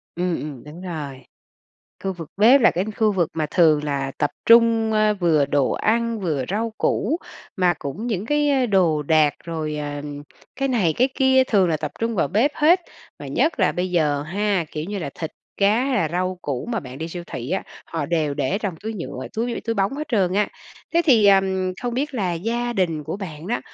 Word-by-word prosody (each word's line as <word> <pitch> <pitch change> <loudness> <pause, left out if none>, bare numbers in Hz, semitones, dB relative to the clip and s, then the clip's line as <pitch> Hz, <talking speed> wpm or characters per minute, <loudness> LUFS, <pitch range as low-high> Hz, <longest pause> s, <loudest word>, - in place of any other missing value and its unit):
Ừm, 175 -1 -1
ừm, 145 -5 -7
đúng 150 +4 -11
rồi. 150 -7 -6 0.8
Khu 190 - 0
vực 165 -4 -9
bếp 240 +7 +6
là 235 - +6
cái 180 - -1
khu 215 -2 +3
vực 175 -4 +1
mà 155 -1 -1
thường 155 -4 +4
là 140 -2 -2
tập - - +1 0.2
trung, 230 -1 +5
ơ, 215 -1 +3
vừa 165 -7 +2
đồ 140 -1 +1
ăn, 230 0 0
vừa 155 -8 -1
rau 220 +3 -1
củ, 295 +11 0 0.4
mà 180 -2 +3
cũng 160 - -5
những 215 -3 -2
cái 290 -3 +2
đồ 175 -8 +2
đạc 150 -1 +3
rồi, 155 -2 -3
ờ, 145 -1 -4 0.5
cái 275 0 0
này, 210 -11 +2
cái 255 +2 +3
kia, 265 -1 +4
thường 195 -7 +3
là 160 - +1
tập - - -4
trung 230 0 0
vào 165 -7 +1
bếp 220 - +2
hết, 340 +5 +4 0.4
và - - -8
nhất 315 -6 0
là 185 - +3
bây 180 +1 -2
giờ 150 -5 +1
ha, 195 +2 0
kiểu 150 - -4
như 205 0 -3
là, 160 -6 -4
thịt, 160 - -5 0.3
cá 210 +5 +3
hay 275 -1 0
là 165 - +1
rau 185 +2 -2
củ 135 -4 -3
mà 230 -3 -2
bạn 130 -3 -10
đi 160 +2 -4
siêu 175 +1 -6
thị 120 +3 -6
á, 190 - 0 0.2
họ 160 -3 -3
đều 155 -3 0
để 145 +7 -1
trong 200 -5 -3
túi 220 +1 -5
nhựa, 180 - -6
túi 235 +1 -1
túi 230 - -1
bóng 195 +1 +1
hết 305 +1 -5
trơn 195 - +1
á. 205 0 +2 0.5
Thế 340 - +4
thì, 230 -9 +5
ờm, 190 -1 +3
không 245 -1 -2
biết 285 +3 -2
là 190 -7 0
gia 235 +7 -2
đình 165 -7 -1
của - - -4
bạn 165 -5 -7
đó, 235 +4 -1
190 Hz, 215 wpm, -22 LUFS, 155-230 Hz, 0.8 s, bếp